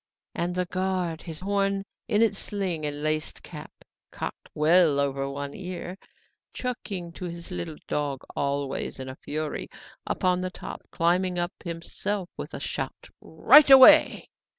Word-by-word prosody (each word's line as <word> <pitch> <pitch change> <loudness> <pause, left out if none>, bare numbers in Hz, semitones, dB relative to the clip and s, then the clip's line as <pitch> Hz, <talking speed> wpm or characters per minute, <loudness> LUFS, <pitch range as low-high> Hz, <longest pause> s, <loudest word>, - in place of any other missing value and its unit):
and 175 +1 -2
the 180 0 0
guard, 185 -2 -2
his 160 -2 -8
horn 195 0 0 0.2
in 220 -1 +3
its 210 -3 +1
sling 180 -7 -2
and 145 0 -4
laced 155 0 -2
cap - - -10 0.4
cocked - - -7
well 155 -1 +5
over 140 -1 -1
one 140 0 -5
ear, 180 -1 -6 0.6
chucking 200 -9 -4
his 170 0 -7
little 165 -3 -5
dog, 145 -2 -2
always 140 -1 -2
in 130 - -6
a 130 - -7
fury, 155 0 -4 0.4
upon 180 0 +1
the 185 - -2
top, - - -8
climbed 180 +2 +1
up 175 0 -1
himself 175 +3 -4
with - - -7
a - - -5
shout: - - -5
'Right 295 -1 +6
away! 265 -1 +8
175 Hz, 145 wpm, -26 LUFS, 155-190 Hz, 0.6 s, away